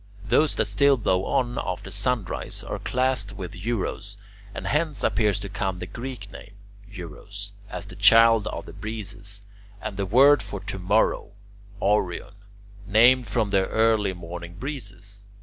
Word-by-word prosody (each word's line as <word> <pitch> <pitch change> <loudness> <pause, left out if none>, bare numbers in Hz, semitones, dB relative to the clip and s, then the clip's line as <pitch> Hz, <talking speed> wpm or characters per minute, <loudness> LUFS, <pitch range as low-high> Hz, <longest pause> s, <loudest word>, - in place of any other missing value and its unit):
Those 150 +7 +3
that - - +1
still 140 -1 +3
blow 95 -4 +1
on 125 -3 0
after 90 -1 -5
sunrise 105 -1 -2
are - - -5
classed 125 -5 0
with 90 -3 -7
Eurus, 100 0 -3 0.3
and - - -7
hence 150 0 0
appears 105 -3 +2
to 100 - -5
come 95 -1 -2
the 90 - -5
Greek 115 -2 -7
name 100 +1 -12 0.3
[Greek: 105 0 -12
euros] 100 +5 -9 0.2
as - - -5
the - - -11
child 115 -1 +6
of - - -5
the - - -10
breezes, 105 -2 -4 0.4
and 100 - -6
the 100 -1 -1
word 135 +6 +6
for 100 0 -4
"to 100 0 -5
morrow," 100 +2 +1 0.5
[Greek: - - -16
aurion], 95 -3 -1 0.5
named 120 +4 +5
from 110 -5 0
the 95 -1 +2
early 110 -3 +2
morning 85 0 -8
breezes. 100 -5 -7
105 Hz, 160 wpm, -25 LUFS, 100-120 Hz, 0.5 s, child